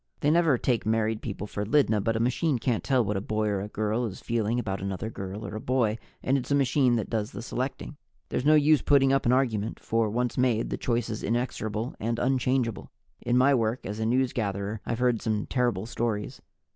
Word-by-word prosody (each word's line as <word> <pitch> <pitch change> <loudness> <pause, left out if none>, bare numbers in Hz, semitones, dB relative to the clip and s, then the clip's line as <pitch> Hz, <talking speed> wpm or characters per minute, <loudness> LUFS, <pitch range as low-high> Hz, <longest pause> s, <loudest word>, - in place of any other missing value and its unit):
They 145 - +3
never 165 -5 +4
take 120 -1 0
married 110 0 0
people 105 -2 -5
for 105 0 -4
Lydna, 110 -3 +2
but 115 +1 0
a - - 0
machine 130 +5 +1
can't 120 -1 -1
tell 130 -4 +2
what 105 0 -1
a - - -2
boy 110 +1 -1
or 100 0 -2
girl 110 +3 -1
is 100 - -8
feeling 115 0 -1
about 100 -5 -2
another 100 +3 -4
girl 100 +2 -6
or 110 - -5
boy, 120 -3 0 0.2
and 135 +1 +2
it's 125 - -7
a 140 - +3
machine 135 -2 +3
that 110 -4 -1
does 110 -2 -2
the - - -6
selecting. 130 +4 -4 0.3
There's - - -1
no 155 +2 +5
use 150 0 +5
putting 135 -2 +4
up 135 - +1
an - - +4
argument, 115 -5 0
for, 115 -1 0
once 120 +3 -1
made, 120 -3 +1
the - - 0
choice 120 -2 -1
is 110 - -4
inexorable 115 -1 -2
and 115 +2 -1
unchangeable. 125 -3 0 0.3
In 120 +1 +1
my 135 +3 +5
work 115 -1 0
as 105 +2 -5
a - - -1
newsgatherer, 110 -4 -1
I've 115 - -1
heard 125 -2 +1
some 110 -2 -1
terrible 125 -3 0
stories. 110 -3 -3
115 Hz, 210 wpm, -27 LUFS, 110-130 Hz, 0.3 s, no